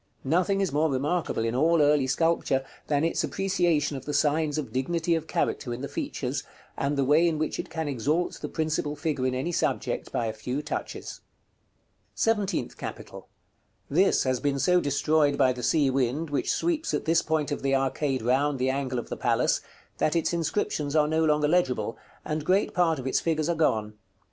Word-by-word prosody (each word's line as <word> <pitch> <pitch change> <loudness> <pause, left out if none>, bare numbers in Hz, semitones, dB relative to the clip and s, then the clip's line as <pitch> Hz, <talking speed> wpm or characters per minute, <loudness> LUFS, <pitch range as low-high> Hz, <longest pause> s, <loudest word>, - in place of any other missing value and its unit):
Nothing 180 +7 +1
is 195 - 0
more 155 +3 +2
remarkable 140 -2 -1
in 115 - -1
all 160 +6 +3
early 145 -2 +4
sculpture, 135 -2 +1 0.2
than 145 0 +1
its 165 - 0
appreciation 175 -6 0
of 135 - -7
the 150 - -2
signs 150 +1 +1
of 150 - -4
dignity 165 +6 0
of 160 -1 -1
character 120 -5 -1
in 125 - -8
the 140 - -3
features, - - -3 0.3
and 140 +1 -1
the 140 - +2
way 155 +5 +4
in 160 -2 0
which 155 0 -2
it - - -4
can 160 -2 -3
exalt 145 +6 -1
the - - -4
principal 155 -2 -1
figure 145 -4 -1
in 130 - -1
any 135 +7 -2
subject - - -1
by 120 - -1
a 110 - -2
few 125 +6 -4
touches. 150 - -5
§ - - -4
CV. - - -12 1.0
SEVENTEENTH 205 - 0
CAPITAL. - - -8 0.6
This 185 +7 +3
has 130 -2 0
been 140 +1 0
so 180 +6 +3
destroyed 145 +1 +2
by 130 -2 +4
the 125 - -7
sea 140 +2 +2
wind, 135 +4 -1
which 145 - 0
sweeps 330 -1 0
at - - -3
this 165 +1 +3
point 155 -2 -1
of 145 - -2
the 135 0 +1
arcade 135 -1 0
round 135 +4 +2
the 130 +1 +1
angle 135 -2 -2
of 120 - -4
the - - -3
palace, - - +1 0.4
that 155 - +1
its 165 +1 +1
inscriptions 160 -3 -1
are 150 -1 +4
no 160 +1 +1
longer 150 -1 +3
legible, 130 -10 +1 0.3
and 155 0 -2
great 190 +6 +2
part 170 -3 +2
of 130 - -7
its 130 - +1
figures 155 -2 0
are - - +3
gone. 110 -9 +1
150 Hz, 200 wpm, -27 LUFS, 135-165 Hz, 1.0 s, early